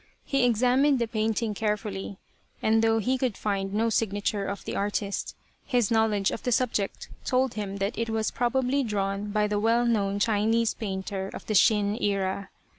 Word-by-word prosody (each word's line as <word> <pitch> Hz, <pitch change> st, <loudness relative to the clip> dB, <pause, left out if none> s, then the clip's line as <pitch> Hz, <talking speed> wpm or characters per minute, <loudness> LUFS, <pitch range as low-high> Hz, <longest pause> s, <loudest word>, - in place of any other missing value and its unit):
He 275 Hz, -2 st, +2 dB
examined 250 Hz, +4 st, +3 dB
the 235 Hz, -2 st, 0 dB
painting 220 Hz, 0 st, -1 dB
carefully, 205 Hz, -2 st, -3 dB, 0.4 s
and 220 Hz, 0 st, +3 dB
though 225 Hz, 0 st, +3 dB
he 255 Hz, +4 st, 0 dB
could 245 Hz, -5 st, -1 dB
find 195 Hz, -2 st, -2 dB
no 225 Hz, +3 st, +1 dB
signature 205 Hz, -1 st, 0 dB
of 200 Hz, 0 st, -5 dB
the -, -, -4 dB
artist, 200 Hz, 0 st, -2 dB, 0.3 s
his 245 Hz, -6 st, +1 dB
knowledge 220 Hz, -3 st, +2 dB
of -, -, -5 dB
the 250 Hz, -, -1 dB
subject 225 Hz, -5 st, -1 dB
told 260 Hz, -1 st, +1 dB
him 200 Hz, -2 st, -4 dB
that 200 Hz, +4 st, -2 dB
it 230 Hz, 0 st, -1 dB
was 220 Hz, -1 st, 0 dB
probably 255 Hz, +3 st, +1 dB
drawn 200 Hz, -3 st, -2 dB
by 210 Hz, 0 st, +1 dB
the 210 Hz, 0 st, 0 dB
well 230 Hz, +3 st, +3 dB
known 200 Hz, -4 st, +1 dB
Chinese 220 Hz, +2 st, +2 dB
painter 190 Hz, -1 st, -4 dB
of -, -, -8 dB
the 215 Hz, -, -2 dB
Shin 210 Hz, +1 st, +3 dB
era. 195 Hz, -1 st, -1 dB
215 Hz, 175 wpm, -27 LUFS, 200-230 Hz, 0.4 s, examined